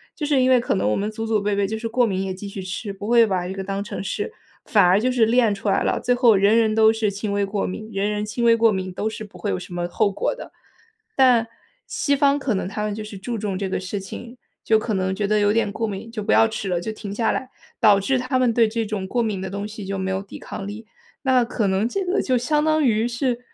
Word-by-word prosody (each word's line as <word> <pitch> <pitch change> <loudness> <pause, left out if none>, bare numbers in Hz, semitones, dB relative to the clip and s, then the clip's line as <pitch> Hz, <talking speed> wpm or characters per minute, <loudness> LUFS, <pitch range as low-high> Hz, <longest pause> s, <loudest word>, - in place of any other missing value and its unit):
就 300 - -3
是 285 -3 +2
因 255 - +3
为 255 -1 +6
可 - - -1
能 100 +2 +1
我 105 - +1
们 205 +2 -1
祖 225 +1 -5
祖 220 -2 +1
辈 205 0 0
辈 200 0 +1
就 220 +2 -3
是， 230 +1 -4
过 245 +2 +2
敏 190 -4 -1
也 190 - -3
继 195 +2 -8
续 195 -1 -6
吃， 190 +3 -5
不 200 +1 -7
会 235 0 +6
把 185 -4 -1
这 190 - -4
个 195 0 -5
当 195 +1 -3
成 205 - -6
是 190 - -3 0.3
反 205 - +4
而 185 +3 +5
就 255 +3 +1
是 240 -3 +3
练 230 -1 +3
出 200 +1 -3
来 195 - +2
了。 - - 0
最 245 - +1
后 240 -4 +5
人 200 +3 +4
人 220 -2 +3
都 220 0 +6
是 220 -2 0
轻 200 +1 -4
微 200 0 +1
过 200 0 -2
敏， 215 +4 -6
人 200 0 -1
人 210 0 -2
轻 215 +3 -3
微 230 0 +6
过 230 -1 +4
敏 190 -2 -3
都 215 +4 -2
是 215 - -7
不 205 - -13
会 205 - -3
有 - - -1
什 180 0 -10
么 175 0 -2
后 200 +3 +1
果 350 - -2
的。 - - -10 0.6
但 245 -4 +4 0.4
西 285 -2 0
方 280 0 +3
可 265 -4 -1
能 190 - -2
他 210 +2 -4
们 210 -1 -2
就 215 +1 -5
是 210 -1 -8
注 230 +4 -4
重 200 -3 -3
这 195 0 -3
个 - - -1
事 185 +2 -4
情， 235 +5 -9 0.3
就 220 - +4
可 215 0 -2
能 190 -1 0
觉 205 +1 -1
得 215 +1 +2
有 205 0 +3
点 225 -2 +1
过 225 +2 -2
敏， 210 +3 -6
就 220 - -5
不 - - 0
要 225 - +6
吃 220 -2 -5
了， 175 -1 0
就 220 - -4
停 210 -2 -7
下 225 0 +1
来， 260 - -3 0.3
导 205 -2 +6
致 255 +7 0
他 255 +1 -1
们 250 -2 +2
对 230 -1 +4
这 225 +1 -2
种 205 -3 -4
过 240 +4 0
敏 205 -4 -2
的 190 - -4
东 200 +1 -4
西 210 -2 -8
就 195 0 -3
没 190 0 -2
有 190 - -1
抵 200 - -10
抗 195 - -7
力。 210 +2 -8 0.4
那 260 -2 +4
可 230 -2 -1
能 195 +4 +1
这 390 +10 -2
个 365 +3 +1
就 255 -2 +1
相 300 +5 +1
当 310 0 +2
于 225 -3 +2
是， 240 0 -1
215 Hz, 315 characters per minute, -22 LUFS, 195-235 Hz, 0.6 s, 为